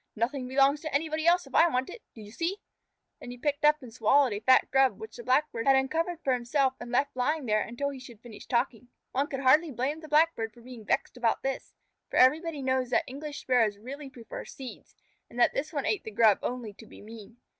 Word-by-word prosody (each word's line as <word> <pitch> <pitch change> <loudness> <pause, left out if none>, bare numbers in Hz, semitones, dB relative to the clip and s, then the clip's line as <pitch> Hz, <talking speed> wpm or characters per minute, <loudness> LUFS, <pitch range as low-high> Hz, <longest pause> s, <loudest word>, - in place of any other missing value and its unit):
"Nothing 250 +4 -2
belongs 275 +3 +3
to 310 - -5
anybody 315 +2 -1
else 350 0 +4
if 270 - -16
I 335 - +6
want 260 -5 -1
it. 485 - -10
Do 225 - -11
you 205 0 -11
see?" 340 - -2 0.6
Then - - -10
he 245 - -8
picked 290 +3 -2
up 300 -1 +4
and 235 -3 -11
swallowed 250 +2 +3
a 205 - -3
fat 255 +4 +4
Grub 270 -1 +3
which 440 - -9
the 475 - -9
Blackbird 260 - 0
had 270 - +6
uncovered 325 +6 -1
for 265 - +2
himself 255 +2 +1
and 240 - -8
left 275 +3 0
lying 290 +4 -1
there 215 -2 +2
until 240 +6 -3
he 270 - -9
should 245 -4 -13
finish 230 -2 -12
talking. 240 -1 -1 0.2
One 275 +3 0
could 270 -2 -5
hardly 300 +5 +4
blame 270 +5 -2
the 315 - -11
Blackbird 300 -8 +2
for 240 - -16
being 240 -2 -11
vexed 250 - -1
about 235 -2 0
this, 270 0 -4 0.3
for - - -3
everybody 300 +2 +3
knows 260 -1 0
that - - +2
English 290 +3 -7
Sparrows 230 -5 +2
really 270 +6 -8
prefer 240 -3 -9
seeds, 260 -2 -11 0.3
and 240 - -9
that 240 - +4
this 300 - -3
one 285 -4 -3
ate 420 - 0
the - - -6
Grub 220 -2 +4
only 245 -4 -4
to 220 +2 -15
be - - -14
mean. 220 +1 -12
260 Hz, 230 wpm, -28 LUFS, 240-295 Hz, 0.6 s, I